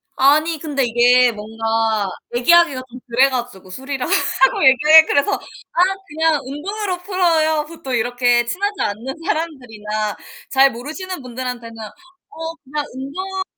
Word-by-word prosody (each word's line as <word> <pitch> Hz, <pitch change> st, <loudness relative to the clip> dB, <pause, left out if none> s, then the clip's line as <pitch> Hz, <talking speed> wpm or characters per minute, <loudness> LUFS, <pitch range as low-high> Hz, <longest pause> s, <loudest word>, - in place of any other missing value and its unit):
아니 305 Hz, +4 st, +3 dB
근데 285 Hz, -3 st, -2 dB
이게 245 Hz, +1 st, +4 dB
뭔가 225 Hz, -1 st, -1 dB, 0.3 s
얘기하기가 285 Hz, +1 st, +4 dB
좀 250 Hz, +1 st, -11 dB
그래 255 Hz, +3 st, +3 dB
가지고 240 Hz, -7 st, -5 dB
술이라 265 Hz, +5 st, -5 dB
하고 335 Hz, -7 st, +2 dB
얘기해 300 Hz, +5 st, +7 dB
그래서 285 Hz, +8 st, +1 dB
"아 -, -, -4 dB, 0.3 s
그냥 320 Hz, 0 st, +1 dB
운동으로 365 Hz, +7 st, -4 dB
풀어요." 325 Hz, -5 st, +1 dB
보통 320 Hz, -5 st, -7 dB
이렇게 245 Hz, 0 st, +1 dB
친하지 405 Hz, -, -2 dB
않는 230 Hz, +7 st, -3 dB
사람들이나 220 Hz, -, -3 dB, 0.3 s
잘 270 Hz, 0 st, +4 dB
모르시는 315 Hz, +9 st, -7 dB
분들한테는 250 Hz, -2 st, -6 dB, 0.5 s
"어 325 Hz, -5 st, -6 dB
그냥 290 Hz, +2 st, -4 dB
운동으로 375 Hz, +9 st, -5 dB
270 Hz, 320 characters per minute, -19 LUFS, 240-325 Hz, 0.5 s, 얘기해